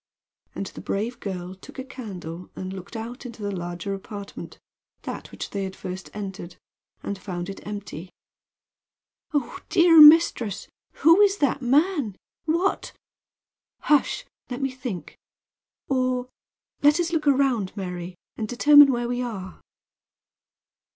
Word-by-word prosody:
And 195 - -3
the - - -9
brave 230 +5 -3
girl 185 -3 -5
took 190 - -14
a 260 - -4
candle 185 -10 -8
and 185 0 -5
looked 190 +4 -9
out 230 +3 -6
into 235 -4 -9
the 205 - -2
larger 175 +2 -4
apartment 200 +1 -8 0.5
that - - -6
which - - -7
they 200 -1 -2
had 190 0 -5
first 185 +1 -7
entered 195 -3 -6 0.5
and 200 -1 -4
found 180 -2 -5
it 195 - -7
empty. 190 -4 -7 1.2
"Oh, 290 -3 -2
dear 340 -3 +7
mistress! 300 - +6 0.4
Who 330 +5 +8
is 405 -1 +4
that 280 -3 +1
man? 280 - +2 0.3
What 340 +5 0 0.5
" - - -69
"Hush! 300 - +3 0.2
Let 245 0 -4
me 270 - 0
think. 250 - -7 0.7
Or 255 -1 0 0.5
let 295 +3 +5
us 340 0 -1
look 310 -2 0
around, 260 -8 +2
Mary, 180 -2 -5 0.2
and 220 - -3
determine 290 +4 +7
where 240 -1 -1
we 245 +1 -2
are." 195 -7 -6
230 Hz, 135 wpm, -25 LUFS, 190-280 Hz, 1.2 s, Who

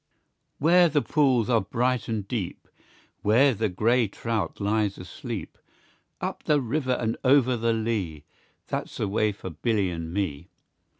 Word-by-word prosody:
Where 175 +3 +5
the 145 -1 +1
pools 130 -7 +2
are 115 -3 +3
bright 125 +5 0
and 110 -3 -3
deep, 105 -7 -4 0.5
Where 125 +6 +4
the 110 0 -1
gray 115 +5 +2
trout 110 +1 -3
lies 105 0 0
asleep, 90 0 -7 0.6
Up - - -4
the 150 -1 +2
river 130 +1 -1
and 115 -2 -1
o'er 130 -1 +4
the 115 0 +1
lea, 105 -9 -2 0.4
That's - - -4
the - - -1
way 105 +1 +1
for 95 -2 -8
Billy 100 +3 0
and 85 -1 -5
me. 90 -7 -3
115 Hz, 145 wpm, -26 LUFS, 100-125 Hz, 0.6 s, Where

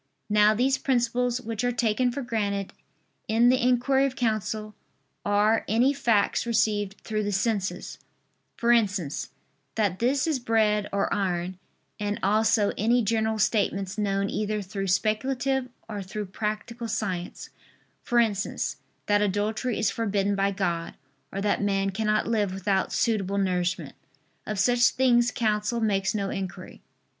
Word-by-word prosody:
Now 210 +1 +5
these 265 +4 +2
principles 245 -1 +1
which 230 -1 -4
are 245 - +2
taken 240 +1 +1
for 275 +2 -4
granted 200 -4 -2 0.5
in 230 +2 +4
the 255 0 +3
inquiry 255 +2 +3
of 260 - -6
counsel 215 -3 -2 0.5
are 210 +2 +2
any 245 +6 +3
facts 235 -4 +1
received 210 -3 +1
through 215 -1 -2
the 205 0 -2
senses 200 0 -2 0.6
for 235 0 +2
instance, 195 -10 +1 0.5
that 200 -4 0
this 260 +3 +2
is 310 -5 0
bread 215 -3 +1
or 200 0 0
iron: 185 -2 -2 0.4
and 205 0 -2
also 215 +1 +3
any 235 +3 +3
general 220 +1 0
statements 205 -2 0
known 195 -1 0
either 210 0 -2
through 195 0 -4
speculative 250 +7 0 0.2
or 210 -2 -5
through 205 +2 -5
practical 215 +4 -4
science; 195 -5 -4 0.5
for 240 - -1
instance, 215 -4 0 0.3
that 205 0 +3
adultery 210 +5 -1
is 220 - +1
forbidden 205 -3 0
by 195 0 +2
God, 175 -4 -2 0.4
or 195 - -4
that 205 0 +1
man 195 -1 +1
cannot 215 +1 0
live 210 -5 0
without 195 0 0
suitable 200 -4 0
nourishment. 180 -4 -1 0.5
Of 215 - -3
such 245 +4 +4
things 240 -2 +3
counsel 215 0 0
makes 200 -3 0
no 200 -2 -1
inquiry. 190 -2 -6
215 Hz, 140 wpm, -26 LUFS, 200-235 Hz, 0.6 s, Now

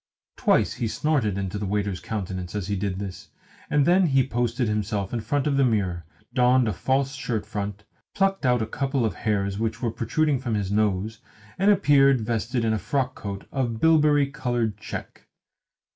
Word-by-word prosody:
Twice - - +2
he 115 - -2
snorted 115 -6 0
into 100 +1 -3
the 105 - -3
waiter's 100 -2 -1
countenance 95 -3 -5
as 100 -1 -3
he 100 - 0
did 95 -1 -2
this, 95 -1 -7 0.4
and 145 -1 +3
then 180 +2 +4
he 135 -3 +3
posted 120 0 0
himself 105 -1 -2
in 115 - -1
front 145 +4 -1
of 145 -2 +1
the 140 - +4
mirror, 95 -8 0 0.3
donned 125 -1 +4
a 110 - 0
false 135 +6 0
shirt 120 -5 -3
front, 100 0 -5 0.3
plucked 195 -2 +1
out 125 -3 +3
a - - -1
couple 135 +1 -1
of 110 - -1
hairs 100 -2 -1
which 110 0 -2
were 115 -3 -1
protruding 135 +5 0
from 120 -4 -2
his 100 -2 -2
nose, 105 +1 0 0.4
and 195 +2 +4
appeared 140 -9 +5
vested 115 +2 -1
in 110 - +2
a 110 - 0
frockcoat 125 -8 -3
of 120 -5 -2
bilberry 150 -1 +4
coloured 120 -6 -2
check. 110 - -8
115 Hz, 180 wpm, -25 LUFS, 105-135 Hz, 0.4 s, appeared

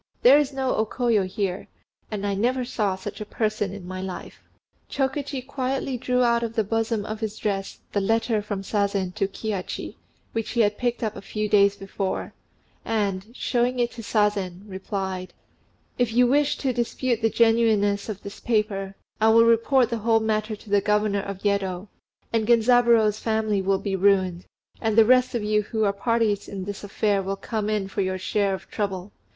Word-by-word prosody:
There 270 +4 +8
is 290 -1 0
no 265 -1 -1
O 220 - +3
Koyo 220 -3 +1
here; 190 0 -3 0.4
and 205 -2 -4
I 200 - 0
never 245 +5 0
saw 210 -6 -1
such 195 +3 -7
a - - -1
person 215 -2 -2
in 195 -3 -8
my 185 0 -5
life." 190 -1 -7 0.5
Chokichi 270 -1 -2
quietly 270 -1 -2
drew 250 +1 +1
out 235 -1 +3
of 230 -1 -4
the 220 - +2
bosom 225 0 -1
of 215 0 -5
his 215 -1 -4
dress 195 -2 -2
the 200 - 0
letter 225 +1 +1
from 205 -2 -4
Sazen 200 -3 -1
to 200 -1 0
Kihachi, 200 -1 -5 0.3
which 225 -1 -3
he 235 - +3
had 210 -1 +1
picked 240 -1 -1
up 215 -1 -2
a - - -7
few 215 +1 -3
days 200 -1 +4
before, 195 -1 -4 0.5
and, 200 -3 -1
showing 250 0 0
it 240 -1 +1
to 250 - -8
Sazen, 205 -4 0
replied, 190 -1 -4 0.6
"If 240 -2 +1
you 250 +1 +5
wish 285 +3 +2
to 265 -3 -1
dispute 240 0 -1
the 225 - +3
genuineness 220 -3 +2
of 205 -2 -6
this 200 - -8
paper, 205 -4 -1 0.3
I 220 - +5
will 230 +1 +6
report 230 +2 +3
the 235 - -1
whole 225 +1 +3
matter 215 0 -1
to 210 - -16
the 205 -1 +4
Governor 210 -1 +1
of 195 -1 -7
Yedo; 195 -1 -1 0.4
and 220 -2 +1
Genzaburô's 235 -2 +4
family 220 -3 0
will 195 +1 +2
be 195 0 -2
ruined, 190 -2 +2 0.4
and 220 -1 0
the 225 - +8
rest 255 +1 +4
of 230 - -1
you 210 0 +2
who 220 +1 -2
are 200 -1 +2
parties 215 0 0
in 195 -2 -5
this 200 +1 -6
affair 205 0 0
will 195 +1 -3
come 215 +1 -3
in 210 -2 0
for 195 - -2
your 185 0 -1
share 195 +1 0
of - - -12
trouble. 195 -2 -3
215 Hz, 190 wpm, -24 LUFS, 200-230 Hz, 0.6 s, There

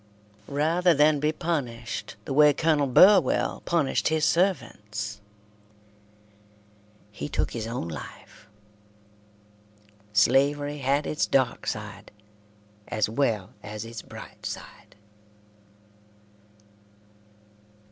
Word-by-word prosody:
Rather 165 +5 +2
than 150 +1 +4
be 150 +2 +1
punished 125 -9 -4
the 135 - -3
way 150 +1 +6
Colonel 155 -3 +1
Burwell 185 +3 +4
punished 165 -6 +1
his 155 -1 +1
servants, 105 - -1 1.9
he 75 -8 -6
took - - -1
his 115 -1 -4
own 115 -7 -4
life. 80 +5 -10 1.6
Slavery 140 +7 +2
had 140 +2 +1
its 150 - -1
dark 130 -2 0
side 105 -2 -5 0.8
as 110 - 0
well 110 -5 -1
as 105 +1 -7
its 115 -1 -8
bright - - -12
side. - - -8
135 Hz, 90 wpm, -26 LUFS, 110-150 Hz, 1.9 s, way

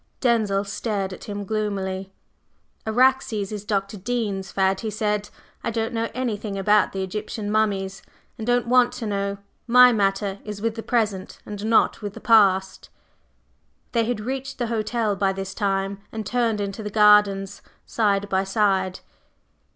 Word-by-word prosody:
Denzil 215 -5 +2
stared 200 -1 -3
at - - -10
him 205 -1 -5
gloomily. 195 -2 -3 0.8
"Araxes 235 -3 +2
is 210 -2 -5
Dr. 205 0 -2
Dean's 200 -3 -3
fad," 190 0 +1
he 220 - -3
said. 210 -1 -1 0.3
"I - - -1
don't 225 +1 -2
know 230 0 -1
anything 215 -5 -3
about 205 +1 +3
Egyptian 205 +2 -4
mummies, 195 -3 0 0.3
and 220 -2 -7
don't 245 0 +2
want 245 0 +4
to 250 -2 -5
know. 200 -1 -2 0.3
My 250 +1 +8
matter 195 -2 0
is 210 -1 -6
with 225 +1 -1
the 225 - -6
present, 215 -6 -1
and 205 -1 -7
not 225 0 +3
with 205 -1 -5
the - - -8
past." 190 -4 +3 1.0
They 230 -2 +1
had 240 -1 -2
reached 265 +4 -4
the 245 - -1
hotel 215 -1 0
by 195 0 +1
this 195 0 -5
time, 195 0 -1
and 220 -1 -5
turned 230 -1 0
into 200 +1 -4
the 210 - -4
gardens 205 -2 +4 0.2
side 205 -3 +1
by 190 -1 +1
side. 195 -2 0
210 Hz, 155 wpm, -23 LUFS, 195-225 Hz, 1.0 s, My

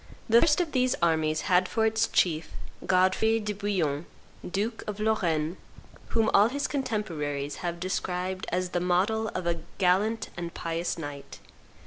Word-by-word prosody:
The 230 +1 +6
first 300 0 +4
of 340 -3 0
these 255 -1 +2
armies 160 -2 +2
had 185 -1 +2
for 220 -1 +1
its 220 0 +2
chief, 160 -3 +1 0.4
Godfrey 190 +5 +3
de 210 -1 -3
Bouillon, 180 -7 -1 0.4
duke 210 +5 -2
of 210 -1 -4
Lorraine, 175 -7 0 0.5
whom 225 -1 +1
all 205 +3 +6
his 285 +3 -2
contemporaries 160 - -2
have 170 -1 -4
described 185 0 -2
as 180 +1 0
the 175 - -1
model 190 +5 +1
of 185 - -3
a 170 -1 0 0.2
gallant 200 +5 +1
and 170 -1 -6
pious 165 +1 -2
knight. 145 -3 -7
185 Hz, 150 wpm, -28 LUFS, 170-220 Hz, 0.5 s, The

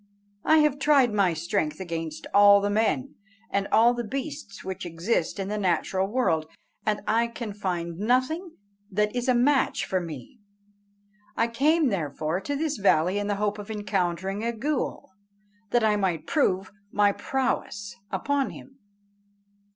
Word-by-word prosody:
I 315 - +5
have 285 -1 0
tried 275 -5 +4
my 195 -5 +2
strength 165 -1 -1
against 165 -4 -5
all 200 0 +8
the 205 0 -1
men 225 +6 0 0.4
and 200 0 0
all 230 +2 +5
the 240 0 -3
beasts 265 -4 -6
which 190 0 -5
exist 170 +3 -1
in 195 -1 -3
the 210 +1 -2
natural 190 +1 0
world, 195 -9 0 0.4
and 210 -1 +1
I 230 +2 +2
can 235 -2 -6
find 175 -4 -3
nothing 260 - 0 0.4
that 210 +3 0
is 245 +1 -1
a 255 - +4
match 270 +3 +2
for 185 - 0
me. 205 - -9 1.0
I 230 - +3
came 290 +5 +2
therefore 155 -2 -2
to 285 - -3
this 300 0 -1
valley 185 0 +3
in 205 - -2
the 205 - 0
hope 205 +1 -1
of 205 - -8
encountering 195 -1 -2
a 235 - 0
ghool, 255 -1 -3 0.6
that 240 +2 +2
I 215 -1 +3
might 185 -6 -1
prove 190 - +1 0.2
my 205 0 +4
prowess 205 -4 -2 0.2
upon 275 +8 0
him." 270 0 -13
205 Hz, 155 wpm, -26 LUFS, 190-250 Hz, 1.0 s, all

